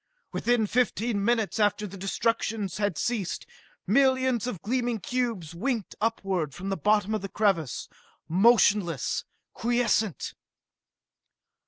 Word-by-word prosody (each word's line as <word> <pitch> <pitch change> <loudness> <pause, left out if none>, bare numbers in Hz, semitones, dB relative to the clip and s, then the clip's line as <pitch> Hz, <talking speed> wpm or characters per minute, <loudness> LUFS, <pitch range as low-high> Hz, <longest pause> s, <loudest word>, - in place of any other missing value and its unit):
Within 240 -2 +1
fifteen 225 -2 0
minutes 225 -1 +1
after 210 0 +2
the 200 -1 -8
destruction 215 +2 -1
had 205 -6 0
ceased, 220 -7 -2 0.4
millions 260 +1 +3
of 205 -9 -5
gleaming 240 0 0
cubes 230 -8 -2
winked 225 +3 -2
upward 190 -9 -1
from 190 +2 -5
the 195 - 0
bottom 210 +1 +2
of 215 - -1
the 195 - -5
crevasse 185 - 0 0.4
motionless, 190 - +3 0.3
quiescent! 235 -5 0
215 Hz, 115 wpm, -27 LUFS, 195-240 Hz, 0.4 s, millions